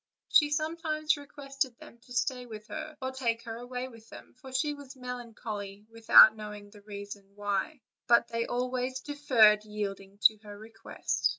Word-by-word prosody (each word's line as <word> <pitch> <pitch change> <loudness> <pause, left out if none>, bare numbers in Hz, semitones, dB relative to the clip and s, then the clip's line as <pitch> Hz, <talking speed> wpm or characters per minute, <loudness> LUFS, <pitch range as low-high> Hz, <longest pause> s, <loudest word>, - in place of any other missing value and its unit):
She 295 -1 +5
sometimes 310 0 0
requested 275 -3 -4
them 235 - -14
to 245 - -21
stay 250 0 -1
with 215 -2 -9
her, 310 0 -6
or 260 - -2
take 235 -3 -1
her 225 -2 -6
away 250 +1 -5
with 230 -3 -15
them, - - -13
for 260 +1 -13
she 295 +3 0
was 285 -2 -11
melancholy 225 -5 -7
without 225 -1 +8
knowing 210 -1 -9
the 205 -1 -15
cause; 200 +4 -4 0.3
but 235 0 +5
they 230 0 -2
always 255 +1 -2
deferred 245 -8 +4
yielding 200 -2 -5
to 215 - +6
her 205 -1 -11
request. 225 +2 -2
235 Hz, 160 wpm, -30 LUFS, 210-265 Hz, 0.3 s, without